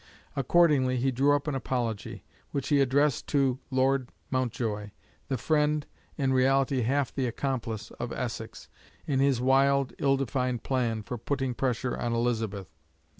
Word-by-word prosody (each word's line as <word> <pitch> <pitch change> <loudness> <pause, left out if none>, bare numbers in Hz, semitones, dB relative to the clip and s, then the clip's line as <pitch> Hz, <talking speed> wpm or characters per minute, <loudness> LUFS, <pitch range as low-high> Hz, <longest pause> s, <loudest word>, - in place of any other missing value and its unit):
Accordingly, 135 -2 +3
he 130 +2 +1
drew 140 +3 +3
up 145 +1 -3
an 150 - 0
apology, 120 -5 -3 0.3
which 140 -2 -3
he 145 -2 +4
addressed 140 +1 +2
to 135 -3 +1
Lord 130 -1 +1 0.2
Mountjoy, 115 -5 -1 0.4
the 135 - -1
friend, 150 +3 +1 0.3
in 135 -3 +1
reality 135 0 +3
half 130 +3 0
the 130 -2 -1
accomplice, 115 -4 -3
of 120 - -3
Essex, 115 -3 -5 0.4
in 135 -3 0
his 135 -3 +3
wild, 135 +1 +3
ill 135 -1 +3
defined 125 -2 -1
plan 120 -5 -1
for 120 +2 -5
putting 135 +1 -1
pressure 125 0 -1
on 120 -1 -2
Elizabeth. 110 -7 -1
130 Hz, 145 wpm, -28 LUFS, 120-140 Hz, 0.4 s, he